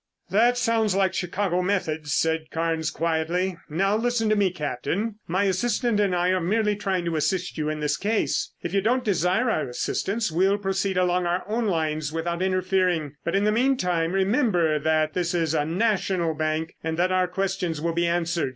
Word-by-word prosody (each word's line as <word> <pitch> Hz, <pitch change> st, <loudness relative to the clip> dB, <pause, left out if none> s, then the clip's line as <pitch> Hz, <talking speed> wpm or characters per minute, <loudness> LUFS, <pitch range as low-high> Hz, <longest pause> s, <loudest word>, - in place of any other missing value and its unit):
"That 235 Hz, +5 st, +4 dB
sounds 225 Hz, -5 st, +1 dB
like 190 Hz, -1 st, +2 dB
Chicago 180 Hz, 0 st, -1 dB
methods," 160 Hz, -6 st, -1 dB
said 160 Hz, +1 st, 0 dB
Carnes 160 Hz, -1 st, -1 dB
quietly. 170 Hz, +3 st, -1 dB
"Now 195 Hz, +6 st, +1 dB
listen 225 Hz, -1 st, 0 dB
to 215 Hz, -, +3 dB
me, 200 Hz, -2 st, +3 dB
Captain. 180 Hz, -, -3 dB
My 185 Hz, +4 st, +1 dB
assistant 210 Hz, +3 st, +1 dB
and 200 Hz, -3 st, +2 dB
I 175 Hz, +1 st, +1 dB
are 185 Hz, 0 st, +1 dB
merely 210 Hz, +4 st, +1 dB
trying 190 Hz, -4 st, -2 dB
to 165 Hz, -2 st, -1 dB
assist 180 Hz, +4 st, -1 dB
you 155 Hz, -1 st, -2 dB
in 155 Hz, 0 st, -3 dB
this 150 Hz, 0 st, 0 dB
case. 215 Hz, +2 st, 0 dB
If 175 Hz, -, -4 dB
you 200 Hz, -, +2 dB
don't 245 Hz, +5 st, +1 dB
desire 190 Hz, +4 st, +1 dB
our 155 Hz, -, -1 dB
assistance 200 Hz, -, -2 dB
we'll 190 Hz, +5 st, +2 dB
proceed 195 Hz, -1 st, -1 dB
along 180 Hz, -1 st, +2 dB
our 175 Hz, +1 st, 0 dB
own 225 Hz, +2 st, -1 dB
lines 155 Hz, -4 st, -1 dB
without 170 Hz, +2 st, -3 dB
interfering, 185 Hz, -5 st, +1 dB
but 170 Hz, -, -1 dB
in 200 Hz, -, +2 dB
the 210 Hz, -, +3 dB
meantime 185 Hz, -9 st, +1 dB
remember 190 Hz, -, +2 dB
that 155 Hz, 0 st, +1 dB
this 175 Hz, -1 st, -1 dB
is 165 Hz, -2 st, 0 dB
a 150 Hz, -2 st, +1 dB
National 185 Hz, -2 st, 0 dB
Bank, 155 Hz, +1 st, -2 dB
and 160 Hz, 0 st, -2 dB
that 180 Hz, +2 st, +2 dB
our 185 Hz, 0 st, +2 dB
questions 180 Hz, -3 st, -2 dB
will 165 Hz, +2 st, -1 dB
be 170 Hz, +1 st, +1 dB
answered. 170 Hz, -3 st, 0 dB
180 Hz, 190 wpm, -25 LUFS, 165-200 Hz, -, That